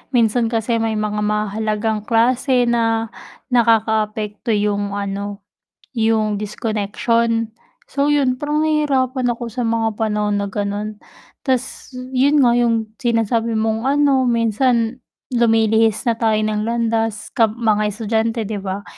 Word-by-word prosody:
minsan 230 0 +3
kasi 230 0 0
may 225 -1 0
mga 210 0 -2
mahahalagang 210 +1 -1
klase 245 +2 +2
na 225 -1 0 0.4
nakakaapekto 220 -2 +1
yung 205 -1 -1
ano, 200 0 -4 0.5
yung 220 -3 +1
disconnection. 225 +2 -1 0.4
So, 285 +1 0
yun 275 -4 +2
parang 300 +3 -1
nahihirapan 265 -5 +1
ako 240 0 -4
sa 235 +2 -4
mga 225 -1 0
panahon 210 -1 -1
na 200 - -4
ganon, 205 +1 -3 0.5
tas 260 0 -2 0.2
yun 275 +3 +3
nga 245 - +5
yung 230 -2 +1
sinasabi 230 -1 0
mong 220 +2 -1
ano 275 -2 +3
minsan 235 +1 +1 0.4
lumilihis 225 -2 +3
na 235 - +3
tayo 220 -2 +2
ng 215 0 -1
landas 225 -2 -1
kam 225 -3 +2
mga 215 -2 +2
estudyante 225 +2 -1
'di 210 0 -4
ba. 195 +1 -4
225 Hz, 125 wpm, -19 LUFS, 215-240 Hz, 0.5 s, nga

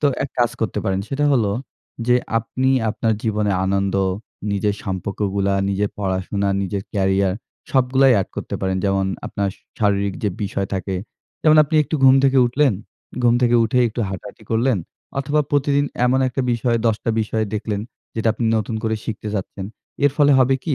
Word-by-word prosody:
তো 150 - +3 0.2
এক 140 - -7
কাজ 120 -1 +3
করতে 110 - -1
পারেন। 95 -1 0
সেটা 145 +2 0
হলো 110 -6 +2 0.6
যে 125 - +5 0.2
আপনি 130 +4 -1 0.2
আপনার 110 0 0
জীবনে 105 -2 0 0.2
আনন্দ 100 0 0 0.6
নিজের 100 0 0
সম্পর্কগুলা 100 +1 -1
নিজের 100 +1 0
পড়াশোনা, 100 +1 -1
নিজের 95 +1 -3
কেরিয়ার 95 -1 +1 0.4
সবগুলাই 130 0 +4
অ্যাড 95 - 0
করতে - - -4
পারেন 95 0 0
যেমন 95 -1 +1 0.2
আপনার 100 -1 -2
স - - -25 0.2
শারীরিক 100 -2 +1
যে 105 - +2
বিষয় 100 -1 -2
থাকে। 95 0 -2 0.5
যেমন 155 -1 +6
আপনি 155 - -5
একটু 150 - -4
ঘুম 130 0 +8
থেকে 135 0 +4
উঠলেন, 135 0 +2 0.5
ঘুম 120 0 +4
থেকে 120 0 +4
উঠে 120 +3 +1
একটু 115 - -5
হাঁটাহাঁটি 100 +3 -8
করলেন 115 -1 +2 0.4
অথবা 145 +2 +1
প্রতিদিন 145 0 +2 0.2
এমন 130 +2 +3
একটা 130 +2 -2
বিষয় 115 0 +1
১০ 115 +1 0
বিষয় 110 0 -1
দেখলেন 105 -1 -2 0.3
যেটা 110 0 0
আপনি 115 - -3
নতুন 110 +1 -2
করে 110 0 0
শিখতে 110 -1 -5
চাচ্ছেন। 95 0 -4 0.4
এর 145 - +6
ফলে 145 -1 +5
হবে 130 +1 +4
কী? 155 -5 0
110 Hz, 170 wpm, -21 LUFS, 100-130 Hz, 0.6 s, ঘুম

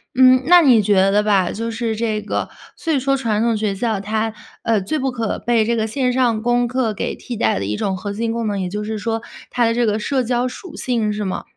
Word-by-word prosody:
嗯， 255 0 +6
那 355 0 +7
你 245 -7 +6
觉 205 0 +2 0.2
得 205 +1 +3
吧， 200 -4 +2
就 230 +2 -4
是 230 -1 -2
这 215 -2 -2
个 - - -3 0.3
所 330 - -3
以 290 - +2
说 275 +1 +1
传 225 -5 -1
统 235 -1 +2
学 210 -2 -1
校 220 0 -1
它， 220 +2 -2 0.3
呃， 220 -3 +2
最 255 +12 -2
不 265 -2 -1
可 230 -3 -2
被 235 -2 +1
这 235 +2 0
个 220 -1 0
线 250 +3 0
上 245 -4 +1
功 240 +1 +2
课 255 -2 0
给 - - -3
替 240 -3 -7
代 110 -3 +1
的 100 - -3
一 105 - -2
种 190 - -1
核 195 +2 -5
心 225 +2 -2
功 230 -1 -2
能， 205 -2 -1
也 185 - -2
就 210 +3 -4
是 215 +1 -3
说 225 +1 -2 0.3
它 245 - +1
的 230 0 +2
这 240 0 +2
个 215 0 0
社 260 +3 0
交 245 +1 0
属 310 +7 -9
性， 225 -4 -1
是 210 0 -3
吗？ 190 - -3
225 Hz, 275 characters per minute, -20 LUFS, 210-245 Hz, 0.3 s, 那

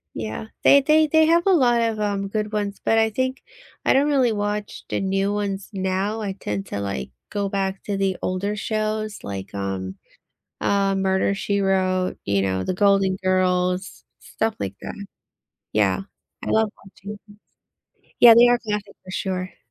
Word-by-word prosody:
Yeah, 110 - -5 0.2
they 280 - +7
they 310 +2 +4
they 315 +1 +4
have 335 +1 +3
a 390 - +4
lot 245 -9 +4
of, 225 -2 0
um, 200 -1 -1
good 210 +1 -3
ones, 205 -1 -3
but 225 - +2
I 220 0 +4
think 260 +4 -2 0.4
I - - +5
don't 275 +2 +3
really 265 -5 +3
watch 205 0 -3
the - - -1
new 195 +1 0
ones 200 -1 -3
now. 190 +3 -1
I 200 -2 -3
tend 105 - -4
to, 100 - -4
like, 65 -11 -4 0.2
go 200 -1 -2
back 195 -1 -2
to 200 -1 -3
the 195 -1 0
older 195 +3 -2
shows 215 0 -2
like, 100 0 -6
um, 95 -1 -4 0.6
uh, 195 -1 +1
Murder 190 0 +1
She 200 0 -1
Wrote, 185 -1 +1
you 100 0 +1
know, 95 -1 -1
The - - -1
Golden 195 -1 +3
Girls, 185 0 0 0.2
stuff 225 0 -2
like 100 0 -4
that. 205 - -7 0.7
Yeah, 105 - +2 0.4
I - - -3
love 220 -1 +2 0.2
watching. 200 +1 -10 1.0
Yeah, 235 -1 +10
they 240 +1 +8
are 245 0 +3
classic 210 -2 -4
for 185 - -10
sure. 185 -1 -3
200 Hz, 170 wpm, -23 LUFS, 185-215 Hz, 1.0 s, Yeah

